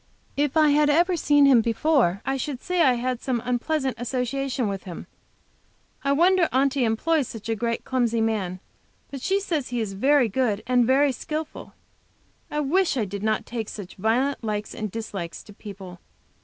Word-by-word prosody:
If 290 +2 0
I 310 -1 +5
had 295 0 +3
ever 345 +5 +3
seen 290 -3 +4
him 260 -4 +6
before 230 - +1
I 270 +1 0
should 270 0 -4
say 360 +3 -1
I 265 -6 +5
had 250 0 -2
some 255 -3 -1
unpleasant 260 +1 -1
association 255 +1 -2
with 195 -1 -4
him. 175 -3 -8 1.0
I 275 - +1
wonder 345 +4 +4
Aunty 265 0 +2
employs 275 +6 +1
such 225 -2 -9
a 225 - +1
great 230 +1 -2
clumsy 240 -3 0
man. 200 -5 -1 0.5
But 275 -2 -6
she 390 +7 +1
says 325 -9 -2
he 245 0 -2
is 215 -3 -3
good, 245 -2 +2
and 245 -1 +3
very 275 +2 +4
skillful. 305 +4 -6 0.8
I 300 - -1
wish 330 +2 +1
I 225 - +1
did 200 0 -6
not 215 0 0
take 225 -2 -5
such 195 -4 -8
violent 240 +7 0
likes 210 -1 -3
and 215 -1 -4
dislikes 195 -5 -6
to 205 - -14
people. 195 -4 -10
250 Hz, 175 wpm, -24 LUFS, 220-290 Hz, 1.0 s, him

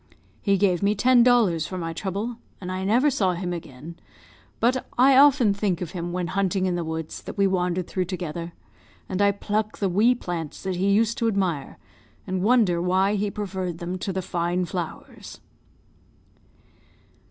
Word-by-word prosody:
He 200 -2 +2
gave 185 -3 +2
me 200 +1 +2
ten 250 +3 +5
dollars 225 -10 +3
for 185 - -6
my 165 -2 -4
trouble, 205 +7 -4 0.2
and 185 -1 -6
I 185 0 -3
never 245 +9 +3
saw 190 -7 +1
him 175 0 -3
again; 160 0 -9 0.6
but 250 +2 +1
I 265 +2 +6
often 270 -6 +6
think 200 -4 -1
of 175 -4 -5
him, 175 -1 -4
when 180 0 -2
hunting 190 +1 0
in 185 - 0
the 175 -1 -2
woods 160 -1 -5
that - - -9
we 200 - +3
wandered 180 -1 0
through 185 -1 -2
together, 175 -2 -5 0.5
and 185 +1 -2
I 200 0 +5
pluck 210 +1 -2
the 195 - 0
wee 220 +7 +3
plants 170 -8 -5
that 190 -1 -2
he 195 +2 +1
used 220 +3 +2
to 230 - +1
admire, 185 -9 -1 0.5
and 185 0 -2
wonder 205 -6 +3
why 190 +3 +2
he 205 0 0
preferred 190 -4 -4
them 175 +2 -5
to 195 - -3
the 190 0 -3
fine 175 0 -1
flowers." 175 -1 -7
190 Hz, 175 wpm, -24 LUFS, 175-210 Hz, 0.6 s, I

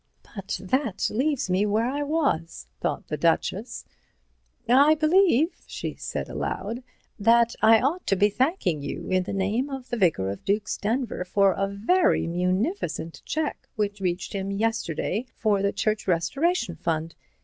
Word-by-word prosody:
"But 195 0 -4
that 230 0 0
leaves 275 +2 0
me 185 +2 +2
where 215 +3 +1
I 280 +3 -2
was," 280 - -1
thought - - -2
the - - -2
Duchess. - - 0 0.8
"I 280 +6 +6
believe," 320 -1 +3
she - - -5
said - - -5
aloud, 220 +6 -4 0.4
"that 230 +2 +4
I 220 0 +7
ought 325 +8 -1
to 195 - +3
be 200 +2 +4
thanking 210 - 0
you 140 - -5
in 185 0 +2
the - - -4
name 205 +8 0
of 265 -2 -7
the 240 - -2
vicar 160 - +2
of 100 - -8
Duke's 200 0 0
Denver 225 -2 -2
for 195 +2 +3
a 195 - -1
very 230 - +2
munificent 180 - -2
cheque 310 0 -3
which 205 -2 -2
reached 180 -1 -2
him 195 -1 -3
yesterday 215 - -1
for 210 -3 +1
the 200 0 +1
Church 215 -1 -1
Restoration 190 - 0
Fund. 165 -1 -2
210 Hz, 155 wpm, -25 LUFS, 185-265 Hz, 0.8 s, I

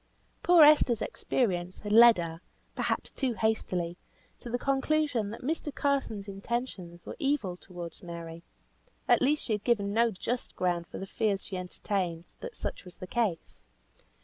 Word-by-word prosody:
Poor 350 -3 +7
Esther's 290 -7 +5
experience 185 -7 -1
had 205 - -4
led 235 0 +9
her, 165 -1 -4 0.3
perhaps, - - -1
too 255 -4 -1
hastily 180 -6 -1 0.4
to 240 - -8
the 245 - 0
conclusion, 275 -3 +1
that 225 - -8
Mr. 305 +2 -2
Carson's 270 -9 -1
intentions 195 -4 -5
were - - -6
evil 275 - 0
towards 175 -2 -9
Mary; 170 -1 -7 0.7
at - - +5
least 290 +3 +2
she 225 - 0
had 210 -1 -2
given 205 -4 +1
no 230 +2 +4
just 230 +4 -4
ground 175 -2 0
for - - -8
the 195 - -5
fears 200 0 -1
she 195 - -6
entertained 180 -2 -3
that 485 - -7
such - - -5
was 180 -2 -13
the - - -7
case. 195 - -2
210 Hz, 160 wpm, -29 LUFS, 180-250 Hz, 0.7 s, led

